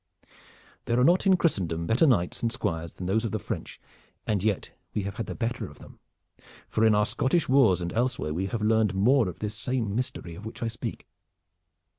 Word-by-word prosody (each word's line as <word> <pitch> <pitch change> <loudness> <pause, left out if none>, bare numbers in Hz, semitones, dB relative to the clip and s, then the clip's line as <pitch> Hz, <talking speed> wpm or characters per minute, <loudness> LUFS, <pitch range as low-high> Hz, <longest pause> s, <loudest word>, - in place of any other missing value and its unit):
There 120 +1 +1
are - - +4
not 175 +7 +4
in 190 -1 +6
Christendom 85 - 0
better 115 - +3
knights 95 -10 +1
and 115 - 0
squires 85 -9 -3
than 90 - -6
those 105 +5 +1
of 115 - -1
the 110 - 0
French, 100 - -6 0.5
and 100 -3 0
yet 105 -3 0 0.2
we 105 - 0
have 100 0 -5
had 115 - -3
the - - -5
better 120 0 -2
of - - -14
them, - - -15 0.7
for 110 - 0
in 110 -1 +5
our 105 0 +3
Scottish 135 +7 +1
Wars 120 -9 +4
and 85 0 -3
elsewhere 120 -10 0
we 95 +4 -1
have 110 +2 -3
learned 110 -2 +2
more 115 +2 +4
of 85 - -8
this 105 -1 -4
same 110 -1 -2
mystery 110 -7 -3
of 100 - -10
which 110 +2 -7
I 115 - 0
speak." 115 - -6
110 Hz, 210 wpm, -27 LUFS, 95-120 Hz, 0.7 s, in